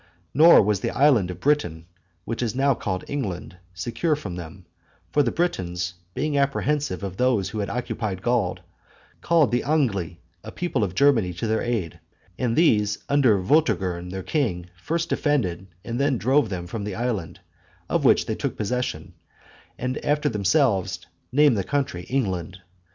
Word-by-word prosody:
Nor 160 Hz, +1 st, +8 dB
was 105 Hz, -1 st, +1 dB
the -, -, -2 dB
island 130 Hz, -10 st, +3 dB
of 90 Hz, -1 st, -6 dB
Britain, 90 Hz, -, 0 dB, 0.4 s
which 115 Hz, +1 st, -3 dB
is 115 Hz, -2 st, -1 dB
now 135 Hz, +1 st, +3 dB
called 95 Hz, -6 st, -3 dB
England, 95 Hz, -10 st, -4 dB, 0.2 s
secure 120 Hz, -, -1 dB
from 105 Hz, -12 st, -6 dB
them; 90 Hz, +1 st, -9 dB, 0.5 s
for 145 Hz, -, +3 dB
the 130 Hz, -, +1 dB
Britons, 90 Hz, -, -2 dB, 0.2 s
being 145 Hz, +2 st, 0 dB
apprehensive 140 Hz, -2 st, 0 dB
of 95 Hz, -1 st, -5 dB
those 120 Hz, -7 st, +2 dB
who 110 Hz, -, -5 dB
had 100 Hz, -2 st, -2 dB
occupied 110 Hz, -4 st, -3 dB
Gaul, 120 Hz, -7 st, +1 dB, 0.6 s
called 165 Hz, -6 st, +3 dB
the 120 Hz, -, +1 dB
Angli, 100 Hz, -, 0 dB, 0.2 s
a -, -, -8 dB
people 170 Hz, -10 st, -1 dB
of 90 Hz, -3 st, -3 dB
Germany, 115 Hz, -10 st, +3 dB
to 90 Hz, +6 st, -4 dB
their 110 Hz, 0 st, 0 dB
aid; 100 Hz, -9 st, -2 dB, 0.4 s
and 120 Hz, -2 st, 0 dB
these 105 Hz, -10 st, +3 dB
under 135 Hz, -7 st, +4 dB
Vortigern 95 Hz, -, +1 dB
their 95 Hz, 0 st, -5 dB
king, 90 Hz, -, -1 dB
first 165 Hz, -, -2 dB
defended, 95 Hz, -, 0 dB, 0.2 s
and 120 Hz, +1 st, -3 dB
then 140 Hz, -2 st, +2 dB
drove 130 Hz, +1 st, +2 dB
them 90 Hz, -3 st, -4 dB
from 100 Hz, +4 st, -5 dB
the 100 Hz, -2 st, -4 dB
island, 110 Hz, -8 st, -3 dB, 0.5 s
of -, -, 0 dB
which -, -, +4 dB
they -, -, -2 dB
took -, -, -3 dB
possession, 105 Hz, -7 st, -3 dB, 0.6 s
and 130 Hz, +1 st, -3 dB
after 150 Hz, 0 st, +1 dB
themselves 100 Hz, -, +1 dB, 0.3 s
named 145 Hz, -1 st, +5 dB
the 100 Hz, -, 0 dB
country 100 Hz, -7 st, -2 dB
England. 95 Hz, -8 st, -2 dB
115 Hz, 160 wpm, -24 LUFS, 95-140 Hz, 0.6 s, Nor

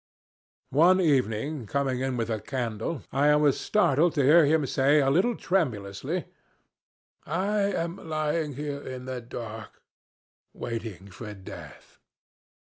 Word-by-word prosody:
"One 175 Hz, +7 st, +5 dB
evening 135 Hz, -, 0 dB
coming 135 Hz, 0 st, -1 dB
in 130 Hz, -1 st, -1 dB
with 115 Hz, -1 st, -2 dB
a 110 Hz, -, -1 dB
candle 125 Hz, +3 st, -3 dB
I 145 Hz, +2 st, +4 dB
was 150 Hz, -2 st, +3 dB
startled 170 Hz, -5 st, +2 dB
to 145 Hz, -, +2 dB
hear 155 Hz, +4 st, +7 dB
him 155 Hz, -1 st, +3 dB
say 135 Hz, +3 st, +3 dB
a 135 Hz, -1 st, +3 dB
little 195 Hz, -, +2 dB
tremulously, 110 Hz, -, -1 dB, 1.0 s
'I 205 Hz, +3 st, 0 dB
am 170 Hz, +1 st, -2 dB
lying 155 Hz, -1 st, -1 dB
here 145 Hz, 0 st, -4 dB
in 130 Hz, -2 st, -7 dB
the 130 Hz, -1 st, -5 dB
dark 115 Hz, -2 st, -8 dB, 0.8 s
waiting 110 Hz, -5 st, -6 dB
for 105 Hz, +2 st, -8 dB
death.' 95 Hz, -1 st, -12 dB
135 Hz, 125 wpm, -27 LUFS, 115-155 Hz, 1.0 s, hear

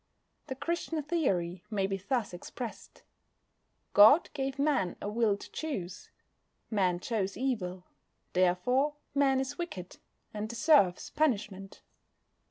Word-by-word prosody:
The 265 Hz, -, -4 dB
Christian 320 Hz, +2 st, -2 dB
theory 190 Hz, -, -1 dB
may 200 Hz, -3 st, 0 dB
be 195 Hz, 0 st, -1 dB
thus 205 Hz, +1 st, -2 dB
expressed: 225 Hz, +6 st, -8 dB, 0.9 s
God 220 Hz, +11 st, +7 dB
gave 270 Hz, -1 st, -3 dB
Man 280 Hz, -, +1 dB
a -, -, -5 dB
will 210 Hz, -1 st, +1 dB
to -, -, -12 dB
choose. 205 Hz, -, -5 dB, 0.6 s
Man 185 Hz, -4 st, +1 dB
chose 200 Hz, -1 st, -2 dB
evil, 190 Hz, -9 st, -2 dB, 0.5 s
therefore 215 Hz, +11 st, +2 dB, 0.2 s
Man 270 Hz, -1 st, +3 dB
is 270 Hz, +3 st, -4 dB
wicked, 185 Hz, -, -6 dB, 0.4 s
and 215 Hz, 0 st, -4 dB
deserves 235 Hz, -, +3 dB
punishment. 210 Hz, -10 st, -1 dB
220 Hz, 115 wpm, -30 LUFS, 190-275 Hz, 0.9 s, God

